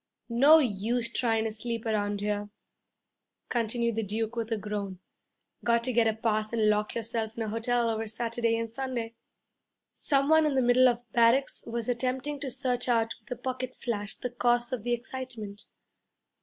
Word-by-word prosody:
'No 275 Hz, +7 st, +7 dB
use 235 Hz, -2 st, 0 dB
tryin' 225 Hz, -3 st, +1 dB
to 220 Hz, -, -1 dB
sleep 230 Hz, +1 st, -3 dB
around 205 Hz, -2 st, 0 dB
here,' 205 Hz, 0 st, -2 dB, 1.0 s
continued 235 Hz, -1 st, 0 dB
the 225 Hz, -, 0 dB
Duke 220 Hz, +2 st, -3 dB
with 230 Hz, -1 st, -3 dB
a 225 Hz, -, +1 dB
groan. 205 Hz, -2 st, -4 dB, 0.7 s
'Got 235 Hz, 0 st, +2 dB
to 255 Hz, +1 st, -1 dB
get 230 Hz, -1 st, +4 dB
a 220 Hz, -, +2 dB
pass 215 Hz, -1 st, 0 dB
and 220 Hz, -2 st, +3 dB
lock 210 Hz, 0 st, -1 dB
yourself 225 Hz, -1 st, -3 dB
in 230 Hz, -, -1 dB
a 220 Hz, -, -3 dB
hotel 235 Hz, +2 st, +1 dB
over 225 Hz, 0 st, -1 dB
Saturday 230 Hz, +1 st, -1 dB
and 230 Hz, 0 st, -2 dB
Sunday.' 235 Hz, -1 st, -4 dB, 0.8 s
Some 275 Hz, -1 st, +1 dB
one 315 Hz, 0 st, +5 dB
in 285 Hz, -, 0 dB
the 260 Hz, -, +3 dB
middle 245 Hz, +1 st, +6 dB
of 240 Hz, 0 st, -3 dB
barracks 235 Hz, +4 st, +3 dB
was 230 Hz, -1 st, -3 dB
attempting 255 Hz, +4 st, -1 dB
to 280 Hz, -1 st, -4 dB
search 255 Hz, -1 st, -1 dB
out 230 Hz, -1 st, +2 dB
with 220 Hz, -, -22 dB
a 250 Hz, -2 st, -5 dB
pocket 255 Hz, 0 st, -4 dB
flash 210 Hz, -4 st, -3 dB
the 250 Hz, -, -5 dB
cause 240 Hz, +1 st, +1 dB
of 250 Hz, -, -2 dB
the 240 Hz, 0 st, 0 dB
excitement. 240 Hz, -4 st, -6 dB
235 Hz, 180 wpm, -29 LUFS, 220-250 Hz, 1.0 s, No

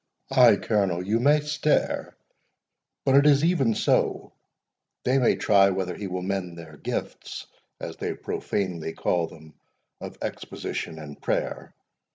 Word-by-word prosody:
Ay, 125 Hz, -5 st, +7 dB
Colonel, 95 Hz, -4 st, 0 dB
you 110 Hz, +4 st, +1 dB
may 145 Hz, +4 st, +4 dB
stare; 150 Hz, 0 st, 0 dB, 0.9 s
but 135 Hz, -, +4 dB
it 140 Hz, +1 st, +6 dB
is 140 Hz, 0 st, +5 dB
even 145 Hz, -10 st, +2 dB
so—they 130 Hz, +2 st, -2 dB
may 125 Hz, -, +3 dB
try 100 Hz, -1 st, +4 dB
whether 95 Hz, -1 st, -2 dB
he 100 Hz, -, -5 dB
will 90 Hz, 0 st, -4 dB
mend 95 Hz, -3 st, -3 dB
their 80 Hz, -2 st, -10 dB
gifts, -, -, -5 dB, 0.3 s
as -, -, -6 dB
they -, -, -3 dB
profanely 85 Hz, -5 st, -3 dB
call 85 Hz, -2 st, 0 dB
them, 80 Hz, -1 st, -15 dB, 0.5 s
of -, -, -8 dB
exposition 80 Hz, -, -5 dB
and 75 Hz, -2 st, -10 dB
prayer. -, -, -2 dB
100 Hz, 135 wpm, -26 LUFS, 90-135 Hz, 0.9 s, Ay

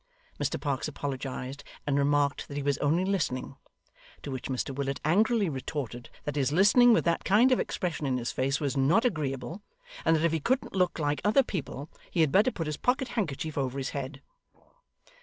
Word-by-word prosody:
Mr -, -, -1 dB
Parkes 140 Hz, -2 st, -1 dB
apologised, 135 Hz, -2 st, -5 dB, 0.2 s
and 140 Hz, -, +1 dB
remarked 145 Hz, 0 st, +1 dB
that 140 Hz, -, -6 dB
he 145 Hz, -, -2 dB
was 140 Hz, -1 st, 0 dB
only 160 Hz, +6 st, +2 dB
listening; 140 Hz, -9 st, -1 dB, 0.7 s
to 140 Hz, -, -5 dB
which 130 Hz, -2 st, -4 dB
Mr 135 Hz, +1 st, -2 dB
Willet 135 Hz, 0 st, -2 dB
angrily 210 Hz, +5 st, +3 dB
retorted, 130 Hz, -4 st, -5 dB
that 145 Hz, -2 st, -3 dB
his 140 Hz, -2 st, +1 dB
listening 205 Hz, +9 st, +6 dB
with 225 Hz, -, +3 dB
that 170 Hz, -1 st, +1 dB
kind 225 Hz, +7 st, +5 dB
of 255 Hz, -, +4 dB
expression 170 Hz, -5 st, -2 dB
in 130 Hz, -1 st, +1 dB
his 120 Hz, -1 st, -2 dB
face 135 Hz, +2 st, 0 dB
was 140 Hz, -2 st, -1 dB
not 145 Hz, -, +3 dB
agreeable, 150 Hz, -, -2 dB, 0.4 s
and 165 Hz, -, +4 dB
that 160 Hz, +1 st, +1 dB
if 170 Hz, -, +3 dB
he 165 Hz, -, 0 dB
couldn't 255 Hz, -, 0 dB
look 185 Hz, -2 st, +1 dB
like 145 Hz, -2 st, -1 dB
other 215 Hz, +6 st, +4 dB
people, 145 Hz, -, -5 dB, 0.2 s
he 170 Hz, -, +1 dB
had 155 Hz, -3 st, +3 dB
better 205 Hz, -, +5 dB
put 170 Hz, -9 st, -4 dB
his 150 Hz, -1 st, -3 dB
pocket 255 Hz, +1 st, 0 dB
handkerchief 160 Hz, -, -2 dB
over 135 Hz, -1 st, -2 dB
his 135 Hz, -1 st, -3 dB
head. 140 Hz, 0 st, -5 dB
145 Hz, 195 wpm, -29 LUFS, 135-185 Hz, 0.7 s, listening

